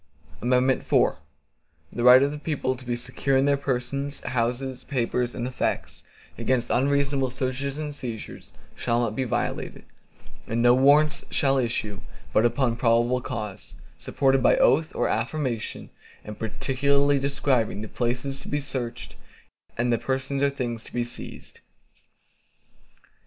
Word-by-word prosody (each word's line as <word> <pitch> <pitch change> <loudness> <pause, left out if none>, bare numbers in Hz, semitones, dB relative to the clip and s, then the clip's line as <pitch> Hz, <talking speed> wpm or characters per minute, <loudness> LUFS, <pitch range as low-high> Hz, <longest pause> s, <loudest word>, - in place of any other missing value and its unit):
IV 120 - -1
The 130 +1 +3 0.9
right 125 +2 +8
of 140 - +1
the 150 - -6
people 145 -4 -1
to 130 - -12
be 120 0 -1
secure 125 +3 -1
in 135 - +3
their 140 0 +4
persons, 140 +1 -3
houses, 125 +2 -2
papers, 125 -2 -1
and 120 - -3
effects, 125 - -3 0.4
against 120 0 0
unreasonable 140 0 +1
searches 130 +2 -3
and 150 -1 -4
seizures, 120 -6 -7 0.2
shall 120 -1 0
not 115 -3 -1
be 130 - -1
violated, 120 - -3 0.6
and 115 - -1
no 120 0 +7
Warrants 145 +4 +4
shall 135 -2 +2
issue, 110 -5 -2 0.3
but 110 +2 +5
upon 120 -2 0
probable 120 +1 +2
cause, 105 -8 -6 0.2
supported 135 - +2
by - - +4
oath 155 +3 +4
or - - +1
affirmation, 120 0 -2 0.3
and 105 0 -8
particularly 140 +5 +1
describing 135 -6 0
the - - -5
place 120 +2 -2 0.2
to - - -11
be 145 - -1
searched, 125 -4 -5 0.6
and 120 0 +1
the 115 - +1
persons 135 +1 -2
or 140 - +4
things 120 -4 -4
to - - -13
be 120 - 0
seized. 120 - -8
130 Hz, 140 wpm, -25 LUFS, 120-140 Hz, 0.9 s, right